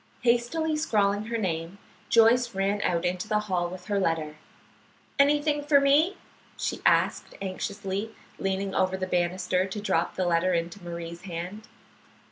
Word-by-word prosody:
Hastily 250 +7 +1
scrawling 205 -8 +1
her 230 +1 -2
name, 170 -2 -3 0.3
Joyce 235 +1 +4
ran 200 +1 0
out 170 -2 0
into 180 +3 -1
the 210 -1 +1
hall 180 -4 -1
with 180 0 -9
her 205 -1 0
letter. 160 -4 -1 0.8
"Anything 290 +1 +3
for 290 -1 +5
me?" 290 +7 +3 0.4
she - - -3
asked, - - +2
anxiously, 200 +2 -4 0.2
leaning 195 0 -1
over 190 0 +1
the 190 - -2
banister 180 +1 0
to 195 +2 -5
drop 190 -5 0
the 185 - 0
letter 175 +1 +2
into 170 +3 -3
Marie's 170 0 -6
hand. 185 +3 -6
195 Hz, 145 wpm, -27 LUFS, 175-225 Hz, 0.8 s, for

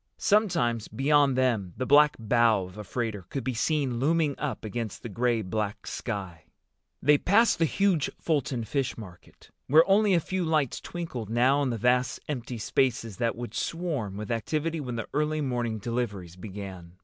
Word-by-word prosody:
Sometimes, 170 - +2
beyond 140 -1 +3
them, 115 -9 +1
the 130 - -2
black 150 +2 +6
bow 115 -2 +3
of 90 +1 -12
a 105 - -7
freighter 105 -4 -4
could 135 - -4
be 130 - -2
seen 130 0 0
looming 155 +1 +2
up 140 -5 -3
against 110 0 -5
the 120 - -5
gray 115 +1 0
black 105 +1 -3
sky. 95 -8 -5 0.6
They 145 +1 +5
passed 220 +1 +3
the 165 - +4
huge 180 -2 +1
Fulton 140 -6 -1
Fish 135 +3 -2
Market, 90 -6 -13 0.2
where 160 +4 +6
only 200 0 +4
a - - +4
few 185 +3 -2
lights 155 -6 0
twinkled 145 -11 -6
now 130 +5 +3
in 140 - +1
the 115 - -2
vast 125 +3 +1
empty 125 -4 -4
spaces 115 -2 0
that 115 -1 0
would 120 0 -7
swarm 150 - -3
with 105 +2 -5
activity 155 +8 -1
when 125 -4 -4
the 115 - -4
early 150 +1 0
morning 120 -5 -1
deliveries 105 -6 -4
began. 95 -3 -8
125 Hz, 175 wpm, -27 LUFS, 110-150 Hz, 0.6 s, black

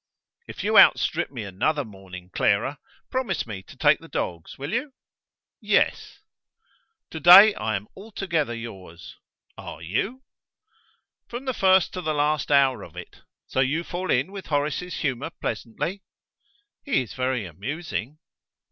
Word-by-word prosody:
"If - - -7
you - - +5
outstrip - - +4
me 120 -5 -6
another 135 +10 -1
morning, 95 -3 -12
Clara, 115 +8 +1 0.3
promise 260 -2 -1
me 100 -4 -7
to - - -16
take - - +4
the - - -13
dogs; 85 -2 -4
will 140 +5 -5
you?" 260 +4 -2 0.7
"Yes." - - +1 0.9
"To 160 - -5
day 190 +7 +10
I 110 - -2
am 100 +1 -4
altogether 185 - -3
yours." 95 -7 -10 0.4
"Are - - -8
you?" 195 - -2 1.0
"From 240 +3 -7
the 260 - -1
first 190 -3 +3
to 185 - -4
the 155 -3 -1
last 150 0 0
hour 135 -3 +4
of - - -12
it! - - -10 0.3
So - - -3
you 140 +6 +1
fall 180 +2 -5
in 130 +9 +1
with 195 -2 -8
Horace's 150 +4 -2
humour 135 0 -2
pleasantly?" 170 - -4 0.8
"He 260 - +1
is 115 - -11
very 130 -4 -1
amusing." 130 - -5
145 Hz, 145 wpm, -25 LUFS, 110-185 Hz, 1.0 s, day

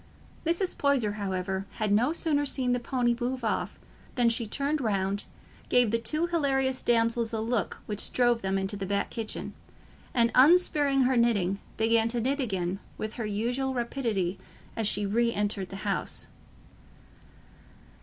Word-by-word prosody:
Mrs. 340 +3 0
Poyser, 275 -7 +2
however, 190 -1 -3
had 215 -2 -1
no 235 +8 +3
sooner 315 -3 0
seen 260 -3 +1
the 245 - +1
pony 240 -1 0
move 250 0 -2
off 220 - -2 0.4
than 240 -3 +4
she 230 0 -1
turned 285 +6 -1
round, 200 -3 -1 0.4
gave 245 -3 +4
the 230 - +1
two 305 +8 0
hilarious 270 -6 0
damsels 230 -1 +1
a 220 - -1
look 225 0 -2
which 210 -1 0
drove 240 -2 +2
them 190 0 0
into 195 +1 -2
the 195 -1 -4
back 200 +1 -1
kitchen, 225 -2 -4 0.6
and 235 -1 +2
unspearing 290 -2 +5
her 260 0 +3
knitting, 200 -5 +2 0.2
began 225 0 +3
to 235 +1 -1
knit 270 +5 0
again 190 -6 -2 0.2
with 215 0 -4
her 225 -3 -4
usual 245 +6 -1
rapidity 225 -7 -1 0.4
as 225 -2 0
she 205 0 +1
re 235 +4 +2
entered 205 -3 -2
the - - -8
house. - - -2
230 Hz, 155 wpm, -28 LUFS, 205-260 Hz, 0.6 s, unspearing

